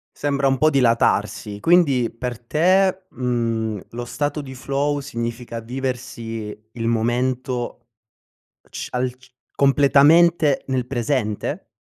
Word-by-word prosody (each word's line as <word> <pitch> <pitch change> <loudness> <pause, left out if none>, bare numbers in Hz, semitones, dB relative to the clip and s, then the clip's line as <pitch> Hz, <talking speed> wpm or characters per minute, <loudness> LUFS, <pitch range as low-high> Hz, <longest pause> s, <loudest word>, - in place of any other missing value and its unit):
Sembra 140 -1 0
un 135 0 +2
po' 155 +5 +4
dilatarsi. 115 -5 +1
Quindi 140 -7 +3
per 120 0 -5
te, 185 +8 +2
mhmm, 115 -4 -1
lo 120 +1 -5
stato 145 +4 -2
di 130 -2 -9
flow 140 +2 -1
significa 115 -2 -5
viversi 115 -4 -5
il 115 -1 -3
momento 120 +1 -1 0.8
c - - -6
al 125 0 -1
c 130 - -22 0.3
completamente 145 +3 +4
nel 130 -2 -1
presente? 120 -4 -2
125 Hz, 110 wpm, -22 LUFS, 115-140 Hz, 0.8 s, po